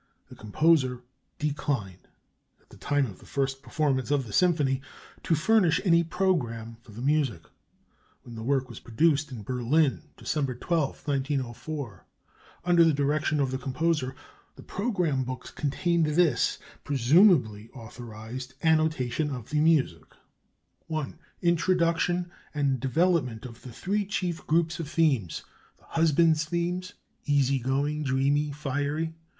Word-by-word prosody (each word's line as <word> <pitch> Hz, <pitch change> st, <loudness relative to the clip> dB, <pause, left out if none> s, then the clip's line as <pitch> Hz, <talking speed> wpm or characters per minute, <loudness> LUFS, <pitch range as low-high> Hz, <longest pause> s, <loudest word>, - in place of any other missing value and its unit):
The -, -, -12 dB
composer 130 Hz, +2 st, +2 dB, 0.3 s
declined, 140 Hz, -10 st, -3 dB, 0.5 s
at -, -, -33 dB
the -, -, -14 dB
time 145 Hz, -1 st, +1 dB
of 100 Hz, -7 st, -9 dB
the -, -, -16 dB
first 135 Hz, -1 st, -2 dB
performance 140 Hz, -4 st, -1 dB
of 140 Hz, -3 st, +1 dB
the 105 Hz, -, -9 dB
symphony, 150 Hz, -7 st, +2 dB, 0.4 s
to 165 Hz, -, +1 dB
furnish 175 Hz, 0 st, +3 dB
any 170 Hz, -2 st, +5 dB
programme 120 Hz, -11 st, -1 dB
for 120 Hz, -, -16 dB
the 115 Hz, +4 st, -8 dB
music. 140 Hz, -, +1 dB, 0.8 s
When 120 Hz, -, -11 dB
the 110 Hz, -, -7 dB
work 130 Hz, +2 st, 0 dB
was 115 Hz, -, -10 dB
produced 145 Hz, +4 st, +1 dB
in 115 Hz, -5 st, -7 dB
Berlin 130 Hz, +6 st, +1 dB, 0.2 s
(December 140 Hz, -5 st, -2 dB
12, 155 Hz, +2 st, -2 dB
1904), 135 Hz, -, -3 dB, 0.6 s
under 175 Hz, -1 st, +5 dB
the 165 Hz, -1 st, +4 dB
direction 150 Hz, +2 st, +1 dB
of 135 Hz, -2 st, +1 dB
the 130 Hz, -, -2 dB
composer, 135 Hz, 0 st, -1 dB, 0.4 s
the -, -, -13 dB
programme 180 Hz, -, -1 dB
books 130 Hz, 0 st, -6 dB
contained 165 Hz, +3 st, 0 dB
this 150 Hz, -3 st, +2 dB, 0.3 s
(presumably 135 Hz, -, +4 dB
authorized) 120 Hz, +2 st, -8 dB
annotation 155 Hz, -3 st, +1 dB
of 125 Hz, -4 st, -7 dB
the 150 Hz, -, +1 dB
music: 150 Hz, -, +2 dB, 0.9 s
"I. 155 Hz, -3 st, -2 dB, 0.3 s
INTRODUCTION 175 Hz, 0 st, +1 dB, 0.2 s
and 140 Hz, -3 st, +1 dB
development 135 Hz, -4 st, +1 dB
of 115 Hz, -2 st, -10 dB
the 130 Hz, -, -10 dB
three 200 Hz, -, -2 dB
chief 180 Hz, -4 st, -3 dB
groups 165 Hz, +1 st, +1 dB
of 160 Hz, -3 st, -4 dB
themes: 140 Hz, -, +1 dB, 0.3 s
The -, -, -25 dB
husband's 160 Hz, -1 st, +3 dB
themes: 175 Hz, +3 st, -2 dB, 0.3 s
(a) -, -, 0 dB
Easy 140 Hz, -1 st, +3 dB
going, 140 Hz, +4 st, -1 dB
(b) 140 Hz, -, -2 dB
Dreamy, 140 Hz, +3 st, +2 dB
(c) -, -, -5 dB
Fiery. 145 Hz, +3 st, -2 dB
145 Hz, 140 wpm, -27 LUFS, 130-165 Hz, 0.9 s, any